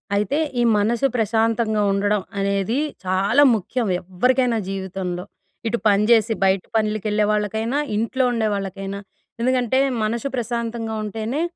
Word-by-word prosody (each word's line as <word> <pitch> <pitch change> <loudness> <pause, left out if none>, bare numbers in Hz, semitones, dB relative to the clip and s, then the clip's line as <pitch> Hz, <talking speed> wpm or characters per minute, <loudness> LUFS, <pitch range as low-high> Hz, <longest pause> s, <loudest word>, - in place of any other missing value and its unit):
అయితే, 210 +8 0 0.2
ఈ - - +3
మనసు 230 +6 +2
ప్రశాంతంగా 225 -1 +1
ఉండడం 205 +1 +1 0.2
అనేది 200 +4 0 0.3
చాలా 195 +10 +3
ముఖ్యం, 220 +3 -2
ఎవ్వరికైనా 245 +6 +1
జీవితంలో. 190 -2 -4 0.4
ఇటు 235 - 0
పని 205 +1 +4
జేసి 225 -1 +4
బయట 190 -1 +2
పనులకెళ్ళే 215 -1 +1
వాళ్ళకైనా, 220 +5 -1 0.2
ఇంట్లో 245 +4 0
ఉండే 225 -2 0
వాళ్ళకైనా. 195 0 -4 0.4
ఎందుకంటే, 255 0 +1 0.3
మనసు 230 +4 -1
ప్రశాంతంగా 235 -1 -3
ఉంటేనే, 220 +7 -3
215 Hz, 120 wpm, -22 LUFS, 200-235 Hz, 0.4 s, పని